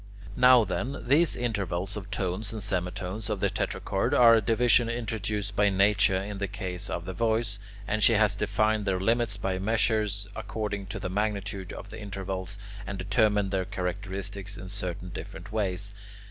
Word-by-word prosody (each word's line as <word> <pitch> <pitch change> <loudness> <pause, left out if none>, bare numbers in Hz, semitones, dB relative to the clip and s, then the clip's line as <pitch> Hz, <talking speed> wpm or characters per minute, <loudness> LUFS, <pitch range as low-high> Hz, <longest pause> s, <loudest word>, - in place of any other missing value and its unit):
Now 125 -2 +7
then, 115 +8 -3
these 155 +5 +4
intervals 100 -5 -1
of 105 -1 -6
tones 100 0 -2
and 110 -3 -5
semitones 95 +1 -2
of 105 -2 -1
the 100 -1 +1
tetrachord - - -1
are 120 -1 +8
a 115 - +5
division 115 +2 +3
introduced 105 -3 -3
by 105 -1 +4
nature 95 -1 +4
in 100 +1 -4
the 100 - -1
case 95 -2 -5
of 85 - -3
the 95 - -4
voice, 110 0 0 0.3
and 110 0 0
she 110 +3 +6
has 105 -1 +3
defined 105 +1 +1
their 95 -1 +1
limits 115 +1 +1
by 95 -2 -1
measures 105 -1 +1
according 105 -3 -4
to 100 - -5
the 90 - -3
magnitude 100 -2 -2
of - - -8
the 110 0 -8
intervals, 95 -1 -4 0.3
and 100 +1 -4
determined 100 +1 +2
their 95 -1 +1
characteristics 100 +2 -4
in 95 - -8
certain 90 -2 -4
different 95 - -8
ways. 100 -2 -2
100 Hz, 170 wpm, -28 LUFS, 95-110 Hz, 0.3 s, are